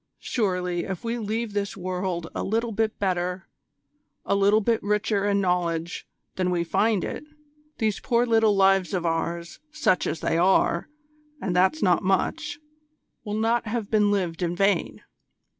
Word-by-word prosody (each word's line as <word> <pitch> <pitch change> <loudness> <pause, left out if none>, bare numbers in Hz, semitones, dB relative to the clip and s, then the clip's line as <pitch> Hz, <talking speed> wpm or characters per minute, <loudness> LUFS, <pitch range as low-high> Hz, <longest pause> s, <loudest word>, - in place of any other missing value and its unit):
Surely 180 -6 -1
if 190 -3 -5
we 235 +1 -2
leave 220 0 -3
this 200 -1 -2
world 180 -2 -3
a - - -3
little 225 +3 -1
bit 220 0 -1
better, 180 -1 -2 0.8
a - - +1
little 200 +2 +4
bit 225 +1 +1
richer 210 0 0
in 200 -1 +2
knowledge, 175 -3 -1 0.3
than 185 -1 +1
we 175 -1 0
find 210 +4 +1
it, - - -5 0.5
these 215 -3 0
poor 240 -1 +1
little 225 -3 +3
lives 195 -2 +3
of 175 -2 -2
ours, 170 +1 -2
such 300 -12 +1
as 165 - -2
they 165 - +1
are, 175 -1 +2 0.5
and 180 -7 -2
that's 190 +13 +3
not 180 -3 +3
much 300 - 0 0.7
will 210 -1 -3
not 230 +1 +1
have 220 -1 -3
been 210 -2 +4
lived 185 -5 -1
in 175 0 -1
vain. 195 -1 +1
195 Hz, 160 wpm, -25 LUFS, 180-220 Hz, 0.8 s, little